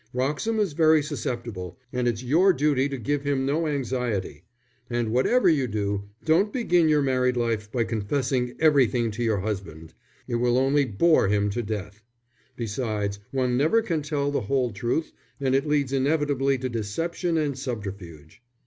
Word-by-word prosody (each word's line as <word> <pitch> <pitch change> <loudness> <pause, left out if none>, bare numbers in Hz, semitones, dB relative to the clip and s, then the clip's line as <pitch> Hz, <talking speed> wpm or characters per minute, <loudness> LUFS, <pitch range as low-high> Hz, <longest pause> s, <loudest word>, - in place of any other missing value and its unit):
Wroxham 150 - -1
is 200 -7 0
very 155 -1 +4
susceptible, 120 - -5 0.2
and 125 -1 0
it's 120 0 -1
your 170 +9 +4
duty 145 -2 +1
to 135 - -4
give 140 +5 -1
him 140 -2 0
no 155 +4 0
anxiety. 125 - -2 0.5
And 120 -2 -1
whatever 185 - +3
you 145 -6 +3
do, 100 -2 -2 0.2
don't 170 +6 +3
begin 175 -10 +2
your 150 -1 +3
married 125 -2 +1
life 115 -3 -1
by 120 -2 +1
confessing 125 +3 -1
everything 130 -7 +3
to 110 +3 -4
your 110 -4 +1
husband. 95 -6 -5 0.3
It 120 - -1
will 120 +1 +2
only 135 +2 +3
bore 130 +3 +3
him 105 0 +1
to 120 - -2
death. 105 -1 -5 0.5
Besides, 105 -3 -3
one 125 -2 0
never 160 - +3
can 165 -7 -1
tell 145 -1 -1
the 145 - 0
whole 125 +2 0
truth, 120 +10 -2 0.3
and 135 -2 0
it 135 +3 +1
leads 145 -3 +1
inevitably 140 -1 +1
to 130 0 -3
deception 165 - -2
and 150 -3 0
subterfuge." 100 - -7
130 Hz, 165 wpm, -25 LUFS, 110-145 Hz, 0.5 s, very